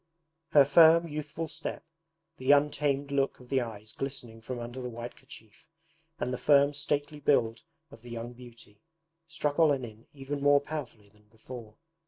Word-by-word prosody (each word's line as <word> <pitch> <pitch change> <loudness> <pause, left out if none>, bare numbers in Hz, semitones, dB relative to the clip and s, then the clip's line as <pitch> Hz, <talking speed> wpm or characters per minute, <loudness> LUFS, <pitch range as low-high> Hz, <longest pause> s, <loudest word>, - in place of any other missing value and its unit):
Her 145 -2 +8
firm 165 +3 +6
youthful 155 +1 -5
step, - - -6 0.5
the 130 +1 +2
untamed 145 -1 +1
look 140 -1 0
of 125 -1 -16
the 135 -1 +2
eyes 110 -2 -7
glistening 120 -4 -6
from 125 +3 -5
under 120 +2 -6
the 125 - -4
white 120 +1 -7
kerchief, 110 -5 -16 0.5
and 125 - -2
the - - -3
firm 140 0 +4
stately 145 0 -2
build 120 -6 +2 0.3
of 115 - -14
the 120 - -12
young 120 +1 -6
beauty, 120 -4 -15 0.5
struck 155 -2 -2
Olenin 130 -8 +1
even 140 0 -5
more 145 0 +5
powerfully 135 -8 -7
than 105 +1 -27
before. 110 0 -11
135 Hz, 160 wpm, -29 LUFS, 115-145 Hz, 0.5 s, Her